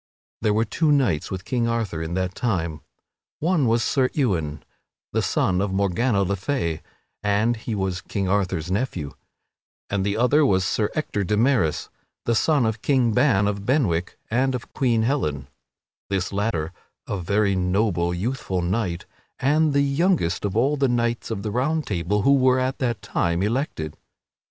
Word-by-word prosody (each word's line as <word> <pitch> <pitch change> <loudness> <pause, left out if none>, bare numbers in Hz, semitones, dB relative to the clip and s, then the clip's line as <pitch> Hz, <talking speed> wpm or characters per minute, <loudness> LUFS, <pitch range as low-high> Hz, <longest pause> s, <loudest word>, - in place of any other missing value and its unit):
There 105 -1 +2
were 110 +1 +2
two 150 +7 +1
knights 125 - +2
with 95 -1 -5
King 120 -3 0
Arthur 115 -8 -1
at 80 +2 -3
that 95 0 -1
time, 85 -10 -2 0.6
one 160 -4 +1
was 115 +1 +2
Sir 130 -2 +2
Ewain, 80 - -1 0.5
the - - +2
son 90 0 +1
of 100 -1 -1
Morgana 100 +3 +1
le 100 +1 0
Fay 90 - -2 0.4
(and 105 +3 +2
he 110 0 -4
was 95 -3 -2
King 100 -2 -3
Arthur's 95 -3 0
nephew), 95 - -2 0.8
and 100 -1 0
the 100 +2 -1
other 135 +6 +4
was 95 -9 +3
Sir 105 +3 0
Ector 105 -9 -1
de 105 +3 0
Maris, 115 - +1 0.3
the 115 - +2
son 140 +2 +3
of 110 -1 -2
King 130 -5 +2
Ban 115 -5 +3
of 100 -1 -2
Benwick 100 - 0
and 130 +3 +2
of 125 - -7
Queen 120 -4 +2
Helen 75 - -1 0.6
this 95 0 -1
latter 95 -6 -1 0.3
a 100 - -2
very 100 +2 +1
noble, 90 -1 +1
youthful 95 -1 -2
knight, 90 -2 -1 0.3
and 150 +3 +2
the 140 0 +3
youngest 140 - +1
of 100 +1 -1
all 140 +5 +2
the 135 -1 +2
Knights 120 -1 0
of 110 -3 -3
the 105 - -2
Round 150 +7 0
Table 100 +2 -1
who 140 - +5
were 130 -1 +4
at 130 +1 -1
that 120 -6 -1
time 85 -2 0
elected. 105 - -2
105 Hz, 170 wpm, -23 LUFS, 95-130 Hz, 0.8 s, who